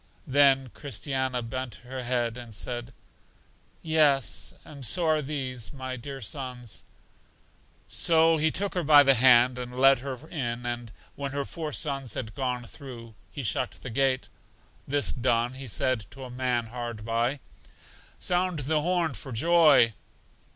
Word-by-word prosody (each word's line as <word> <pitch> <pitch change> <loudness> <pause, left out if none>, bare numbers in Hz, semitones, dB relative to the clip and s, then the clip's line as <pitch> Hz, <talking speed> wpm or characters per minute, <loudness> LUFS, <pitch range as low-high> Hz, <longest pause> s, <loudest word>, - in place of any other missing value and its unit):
Then 135 -2 +4
Christiana 130 -2 -2
bent 125 -1 -5
her 130 +1 -6
head, 120 -2 -1
and 120 -3 -8
said, 120 +2 -4 0.9
Yes, 150 -6 +2
and 140 -3 -11
so 170 +9 +2
are 155 -1 +3
these, 130 -5 -4
my 130 -2 -5
dear 135 +2 -7
sons. 125 -1 -5 1.0
So 165 0 +5
He 160 +1 +2
took 200 +4 -2
her 180 - 0
by 145 -2 +7
the 135 -1 +6
hand 125 0 +5
and 125 0 -7
led 135 0 +6
her 135 +1 -5
in; 120 -7 -3
and 120 -1 -4 0.2
when 140 -1 -5
her 140 0 -2
four 155 -1 -5
sons 135 -6 -2
had 110 -4 -5
gone 125 -2 -3
through, 115 -3 -10 0.2
He 140 - -6
shut 110 - -2
the 125 - -6
gate. 130 +1 +1 0.6
This 145 +1 +2
done, 120 -1 0
He 135 0 -8
said 115 0 0
to 135 - -10
a 125 - -8
man 125 -2 -1
hard 120 -3 -5
by, 120 +5 0 0.8
Sound 180 -1 0
the 155 +1 +1
horn 175 -2 0
for 130 - -8
joy. 150 -3 +5
130 Hz, 150 wpm, -27 LUFS, 120-145 Hz, 1.0 s, by